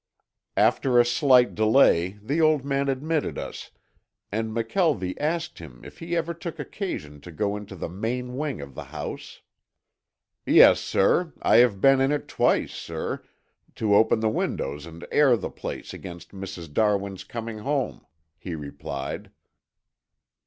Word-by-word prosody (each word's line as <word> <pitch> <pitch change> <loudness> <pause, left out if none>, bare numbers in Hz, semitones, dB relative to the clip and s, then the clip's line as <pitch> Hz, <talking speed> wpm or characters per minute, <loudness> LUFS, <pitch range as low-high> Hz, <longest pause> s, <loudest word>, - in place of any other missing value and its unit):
After 125 -2 +3
a 120 - +6
slight 125 0 +4
delay 110 -5 +3
the 145 +9 0
old 155 -3 +3
man 140 0 0
admitted 150 +3 -1
us - - -7 0.6
and 110 +2 -1
McKelvie 115 - 0
asked 160 +2 -2
him 70 -7 -11
if - - -12
he 170 +1 -2
ever 165 +1 -1
took 170 0 -7
occasion 105 - -5
to 85 - -10
go 100 +5 -1
into 105 -2 -8
the 85 - -5
main 125 +8 -4
wing 145 - -3
of 70 -1 -9
the - - -8
house. - - -7 1.0
"Yes, - - +7
sir. 160 - +1
I - - +5
have 115 -5 +4
been 135 -1 +5
in 145 +2 +2
twice, - - +1
sir, - - -5 0.5
to 105 -2 +1
open 110 +1 +4
the 110 - +2
windows 75 -7 -3
and 85 +1 -10
air 135 -5 +5
the - - -5
place - - -7
against 85 -3 -9
Mrs. 90 -5 -8
Darwin's 100 -1 0
coming 115 -2 -6
home," 135 +3 -2 0.4
he 85 -2 -5
replied. 70 -2 -6
115 Hz, 145 wpm, -25 LUFS, 95-140 Hz, 1.0 s, Yes